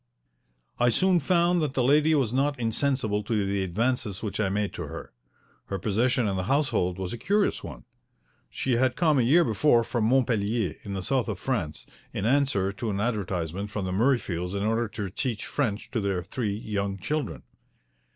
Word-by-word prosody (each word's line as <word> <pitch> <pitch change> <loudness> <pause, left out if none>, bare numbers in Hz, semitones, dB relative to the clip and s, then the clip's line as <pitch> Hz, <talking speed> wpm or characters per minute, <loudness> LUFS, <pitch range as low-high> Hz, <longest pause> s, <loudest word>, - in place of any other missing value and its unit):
I 120 0 +4
soon 185 +8 +3
found 175 +2 +2
that 145 -3 -2
the 130 - +2
lady 150 +4 +4
was 125 -6 +1
not 140 +1 +1
insensible 115 -2 0
to 105 -1 -1
the 100 0 0
advances 105 +2 -1
which 105 -1 -3
I 100 -3 +1
made 100 +1 -1
to - - -5
her. - - -8 0.5
Her 100 - -3
position 115 +4 +1
in 95 -2 -1
the 95 - -2
household 120 -11 +1
was 95 +1 -4
a 120 - -6
curious 205 - +1
one. - - -9 0.6
She 125 - 0
had 130 0 +2
come 155 -5 +3
a - - +5
year 150 +9 +5
before 120 -1 +3
from 120 -1 -1
Montpellier, 115 - +1
in 100 -1 -6
the 95 - -3
South 130 +3 0
of 105 -4 -3
France, 90 -9 -3 0.3
in 100 - -2
answer 120 -7 +2
to 110 +3 -4
an 100 -1 -2
advertisement 100 -4 -2
from 100 -2 -3
the 90 - -2
Murreyfields 95 -5 0
in 100 - -1
order 115 +2 +1
to 100 -3 -5
teach 115 0 -2
French 115 -7 -2
to 115 - -1
their 95 -3 -1
three 105 +1 -3
young 100 -3 -3
children. 100 - -3
110 Hz, 190 wpm, -27 LUFS, 100-130 Hz, 0.6 s, a